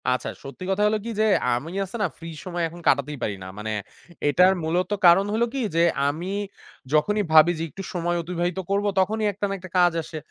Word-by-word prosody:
আচ্ছা 125 0 0
সত্যি 135 +5 -9
কথা 195 +2 +1
হলো 215 +1 +1
কি - - -3
যে, - - +4 0.3
আমি 130 +7 -4 0.2
আছে 195 - -10
না 205 - +3
ফ্রি 165 0 -8 0.2
সময় 175 -2 -3
এখন 170 +2 -11
কাটাতেই 140 +1 +2
পারি 100 - -1
না। - - -8
মানে 110 +1 -4 0.6
এটার 180 +6 +5
মূলত 175 +3 0 0.2
কারণ 175 +3 +7
হইল 225 +2 +2
কি? 275 - -2 0.2
যে 165 - +4 0.3
আমি 160 +5 -3 0.7
যখনই 205 +8 +2
ভাবি 160 +2 +7
যে, - - -2
"একটু 195 - -8
সময় 175 -1 -1
অতিবাহিত 175 +1 -2
করবো।" 200 +1 +1
তখনই 215 +3 +1
একটা 205 +1 -3
না - - -2
একটা 185 +1 -10
কাজ 175 -1 +5
আসে। 155 - -8
175 Hz, 210 wpm, -24 LUFS, 155-195 Hz, 0.7 s, কারণ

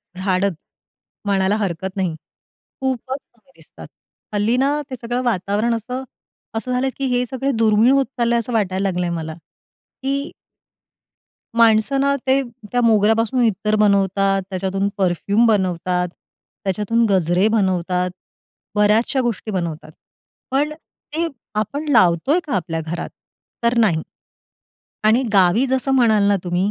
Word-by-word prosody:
झाडत 190 +1 0 0.7
म्हणायला 195 0 +2
हरकत 190 -2 -3
नाही. 185 -5 -1 0.7
खूपच 260 0 -2 0.2
कमी 240 +3 -29
दिसतात. - - -14 0.5
हल्ली 210 +3 +1
ना, 285 +3 +1
ते 260 - -4
सगळं 240 +1 -2
वातावरण 215 0 0
असं 250 +4 -5 0.5
असं 250 +3 -3
झालंय, 250 +1 +1
की 275 - -2
हे 250 - 0
सगळे 265 +2 -2
दुर्मिळ 220 +2 +4
होत 275 -1 +3
चाललंय 235 0 +2
असं 235 +1 -4
वाटायला 195 -3 0
लागलंय 180 -1 -1
मला, 160 -2 -4 0.7
की 275 +2 -2 1.3
माणसं 230 +4 +4
ना 280 0 +2
ते 265 +1 +4 0.3
त्या 245 - +1
मोगऱ्यापासून 225 +2 +3
इत्तर 215 0 +1
बनवतात, 195 -1 +2
त्याच्यातून 195 +1 -1
परफ्यूम 200 +4 +2
बनवतात, 180 -3 +1 0.6
त्याच्यातून 210 +4 +1
गजरे 185 +1 +3
बनवतात, 180 -2 0 0.6
बऱ्याचशा 215 +6 +3
गोष्टी 230 -3 -3
बनवतात. 170 -5 -4 0.6
पण 285 +3 +1 0.4
ते 335 +1 0 0.3
आपण 285 +8 -4
लावतोय 220 - +4
का 285 - -3
आपल्या 165 -3 -2
घरात? 160 +2 -5 0.5
तर 235 +1 +2
नाही. 190 -9 +3 1.0
आणि 220 +4 +4
गावी 195 +6 +4
जसं 265 +1 0
म्हणाल 225 -5 +4
ना 205 - +4
तुम्ही, 180 +3 0
210 Hz, 130 wpm, -20 LUFS, 185-245 Hz, 1.3 s, दुर्मिळ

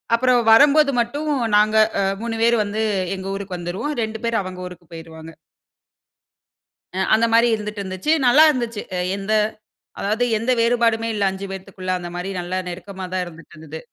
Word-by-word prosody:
அப்பறம் 245 -1 +2
வரம்போது 290 +3 +6
மட்டும், 290 +6 -3 0.3
நாங்க 215 +1 +3 0.3
அ - - +1 0.2
3 230 -1 -3
பேர் 235 0 +4
வந்து 210 +2 -3 0.4
எங்க 190 +1 -7
ஊருக்கு 195 -2 -5
வந்துருவோம். 180 - -4
2 220 0 -5
பேர் 230 -3 +1
அவங்க 185 0 -8
ஊருக்கு 175 -2 -13
போயிருவாங்க. 160 0 -10 1.6
அ - - 0 0.2
அந்த 230 +1 +2
மாரி 235 +1 +5
இருந்துட்டு 210 -1 -6
இருந்துச்சு. 190 - -2 0.2
நல்லா 290 +6 +7
இருந்துச்சு. 235 -5 -3 0.2
எ - - -1 0.2
எந்த 200 +2 -2 0.7
அதாவது 215 +4 0
எந்த 235 +4 -1
வேறுபாடுமே 230 -1 +2
இல்லை 205 -2 0
5 195 +1 -6
பேத்துக்குள்ள. 190 -1 -6
அந்த 175 0 -7
மாரி, 180 +2 -4
நல்லா 180 +2 -4
நெருக்கமா 190 +1 -7
தான் 185 -1 0
இருந்துட்டு 165 -1 -13
இருந்தது. 160 0 -9
210 Hz, 165 wpm, -21 LUFS, 185-235 Hz, 1.6 s, நல்லா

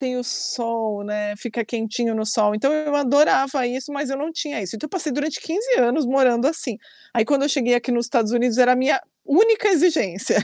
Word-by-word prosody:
Tem 255 -2 -3
o 250 - -2
sol, 230 -4 -3
né, 210 0 -4
fica 230 +1 -5
quentinho 225 0 -3
no 220 0 -2
sol. 210 -1 +1
Então 270 +7 +1
eu 305 -1 -1
adorava 275 -2 +2
isso, 260 +4 -5
mas 285 -1 -3
eu 270 - -2
não 300 +4 -4
tinha 295 -8 -4
isso. 190 +3 -6
Então, 220 - -6
eu - - -14
passei 320 -5 -3
durante 290 +3 -3
15 435 +10 -1
anos 250 +3 +2
morando 255 -1 +2
assim. 270 -8 -1 0.3
Aí 230 -3 +2
quando 280 0 +1
eu 285 - +1
cheguei 245 -4 +2
aqui 240 +1 -1
nos 235 -1 0
Estados 235 -4 0
Unidos 240 0 +1
era 250 0 +6
a - - +2
minha 265 +9 +2 0.3
única 425 +7 +4
exigência. 310 - +2
250 Hz, 220 wpm, -21 LUFS, 230-290 Hz, 0.3 s, era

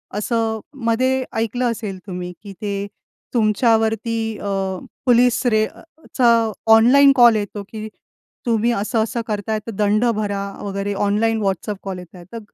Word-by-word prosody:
असं 220 +1 -1 0.3
मध्ये 260 +3 +1
ऐकलं 235 +2 0
असेल 210 -4 -5
तुम्ही, 180 -1 -5
की 200 - -9
ते 200 -1 -3 0.5
तुमच्यावरती 225 0 +2 0.3
अ, - - -8 0.6
पोलिस 245 -1 +3
रेडचा 245 +4 -1 0.5
ऑनलाइन 265 +5 +7
कॉल 240 -3 +7
येतो, 205 -1 -3
की 220 -1 -6 0.6
“तुम्ही 230 0 +2
असं-असं 225 +1 -1
करताय, 215 0 -2
तर - - -3
दंड 210 +2 +1
भरा 205 -2 -2 0.2
वगैरे.” 200 0 -3
ऑनलाइन 220 +2 +1
व्हॉट्सअप 195 +1 -2
कॉल 190 -2 -5
येत 180 0 -13
आहे. 175 - -11
तर 230 - -5
220 Hz, 135 wpm, -20 LUFS, 205-235 Hz, 0.6 s, ऑनलाइन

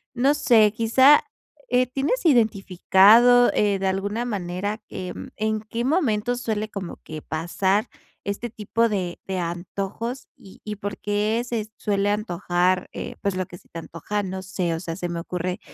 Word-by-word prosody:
no 270 +4 +3
sé, 230 -8 +4
quizá, 260 - +5 0.5
eh, 250 +1 +3
¿tienes 275 - -1
identificado, 225 - +5
eh, 205 -2 +2
de 190 0 -1
alguna 200 +4 -1
manera, 205 -1 -3
eh, 185 -1 -5 0.2
en 215 0 -1
qué 230 +2 -4
momento 245 - +1
suele 215 -3 -2
como 195 -4 -6
que 155 -1 -7
pasar 190 +6 0 0.3
este 200 +4 -4
tipo 230 +2 0
de 185 -5 -3
de 190 -1 -3
antojos? 195 +8 -4
Y 190 - -16
y, 210 -1 -5
¿por 205 0 -5
qué 210 +2 0
se 225 -3 -3
suele 205 -1 0
antojar?, 180 -3 0
eh, - - -6
pues 200 -2 -1
lo 185 0 -1
que 175 - -11
se - - -23
te 165 - -8
antoja, 170 +6 -4
no 190 0 -5
sé. 185 -2 -2
O - - -4
sea, 165 -1 -5
se 175 -1 -4
me 170 - -3
ocurre, 180 +1 -3
205 Hz, 170 wpm, -24 LUFS, 185-230 Hz, 0.5 s, quizá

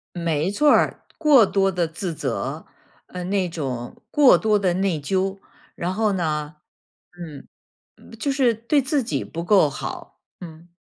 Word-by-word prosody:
没 170 -1 -1
错 295 +9 +3
儿。 - - +3 0.2
过 290 -8 +5
多 195 0 +1
的 175 -2 0
自 170 +2 -5
责， - - -4 0.4
嗯， 180 0 -6
那 195 -3 +1
种 130 -7 -6
过 290 -3 +6
多 215 -1 +2
的 185 -3 +1
内 185 -4 0
疚， 190 +5 -1 0.4
然 180 +2 -3
后 215 0 +1
呢 155 -4 -2 0.6
嗯， 155 -5 -9 0.5
嗯， - - -18
就 280 +5 -1
是 265 -4 +2
对 235 +7 +1
自 270 +1 0
己 230 - -2
不 170 - -6
够 180 -4 +4
好， 135 - -8 0.2
嗯。 165 0 -12
185 Hz, 165 characters per minute, -22 LUFS, 165-220 Hz, 0.6 s, 过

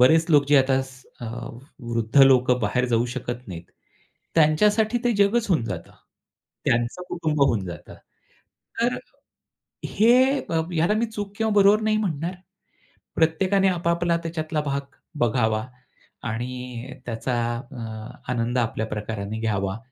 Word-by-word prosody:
बरेच 160 +6 +5
अ, - - +1
लोक 145 -1 +6
जे 145 - +6
आता 135 0 +3
स 130 -1 -13 0.2
अ, 120 - -5 0.5
वृद्ध 120 +3 +2
लोक 130 -2 +5
बाहेर 125 +4 +1
जाऊ 120 0 +2
शकत 125 0 -5
नाहीत. 85 -2 -7 0.7
त्यांच्यासाठी 210 +9 +3
ते 240 - +3
जगच 210 +3 +3
होऊन 160 -11 +2
जातं. 90 -6 -6 0.7
त्यांचं 120 +9 0
कुटुंब 155 -4 -2
होऊन 110 -8 +2
जातं. 85 - -9 0.9
तर 240 +1 +1 0.9
हे 230 +3 +4 0.3
अ, 165 -1 -1
ह्याला 170 +5 +2
मी 230 +2 +1
चूक 205 -2 -6
किंवा 220 -1 +1
बरोबर 205 +1 +5
नाही 215 0 +2
म्हणणार. 175 -4 -2 0.8
प्रत्येकाने 185 +5 +2
आपापला 170 -1 0
आता 170 - 0
त्याच्यातला 155 -2 -2
भाग 140 -1 -2 0.4
बघावा, 110 -2 +1 0.6
आणि 125 +2 -5
त्याचा 120 +2 -3 0.4
अ, 120 -3 -8 0.5
आनंद 120 +1 -1
आपल्या 110 -1 -1
प्रकाराने 105 0 -4
घ्यावा. 100 -2 -1
140 Hz, 135 wpm, -24 LUFS, 120-180 Hz, 0.9 s, लोक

